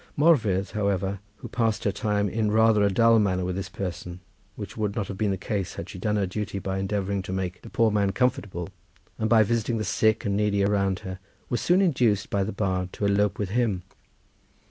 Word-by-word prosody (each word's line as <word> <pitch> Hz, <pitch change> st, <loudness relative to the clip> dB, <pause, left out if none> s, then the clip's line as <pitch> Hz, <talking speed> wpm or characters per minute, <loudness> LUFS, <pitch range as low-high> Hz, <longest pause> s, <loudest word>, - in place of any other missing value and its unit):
Morfudd, 110 Hz, -, +3 dB
however, 100 Hz, -2 st, -1 dB, 0.2 s
who -, -, -9 dB
passed 115 Hz, -4 st, 0 dB
her 100 Hz, -, +2 dB
time 105 Hz, -1 st, 0 dB
in 110 Hz, +2 st, 0 dB
rather 110 Hz, 0 st, +4 dB
a 100 Hz, -, +4 dB
dull 115 Hz, +3 st, +5 dB
manner 95 Hz, -3 st, +1 dB
with 90 Hz, 0 st, -2 dB
this 95 Hz, -1 st, -4 dB
person, 90 Hz, -2 st, -5 dB, 0.4 s
which 105 Hz, -, -7 dB
would 105 Hz, -2 st, -2 dB
not 100 Hz, -3 st, -2 dB
have 100 Hz, -, -4 dB
been 105 Hz, -2 st, +1 dB
the 95 Hz, -, 0 dB
case 100 Hz, -1 st, -3 dB
had 85 Hz, -, -6 dB
she 95 Hz, -, -9 dB
done 105 Hz, +3 st, 0 dB
her 100 Hz, -2 st, +1 dB
duty 100 Hz, +1 st, -4 dB
by 95 Hz, 0 st, -3 dB
endeavouring 100 Hz, 0 st, -1 dB
to 95 Hz, -, -7 dB
make 95 Hz, -1 st, -3 dB
the -, -, -11 dB
poor 115 Hz, -2 st, +2 dB
man 100 Hz, -2 st, +2 dB
comfortable, 95 Hz, -6 st, -1 dB, 0.5 s
and 110 Hz, -, 0 dB
by 110 Hz, -1 st, +6 dB
visiting 115 Hz, +1 st, 0 dB
the 110 Hz, -, -1 dB
sick 110 Hz, +2 st, +1 dB
and 100 Hz, -1 st, 0 dB
needy 100 Hz, -1 st, +1 dB
around 100 Hz, -2 st, +1 dB
her, 95 Hz, 0 st, -7 dB, 0.3 s
was 120 Hz, -, -1 dB
soon 185 Hz, +3 st, +3 dB
induced 120 Hz, -, +1 dB
by 100 Hz, -1 st, +1 dB
the 105 Hz, -, -3 dB
bard 95 Hz, -2 st, -1 dB
to 105 Hz, -, -2 dB
elope 100 Hz, 0 st, +2 dB
with 100 Hz, -3 st, -2 dB
him. 105 Hz, -5 st, 0 dB
100 Hz, 215 wpm, -26 LUFS, 95-110 Hz, 0.5 s, by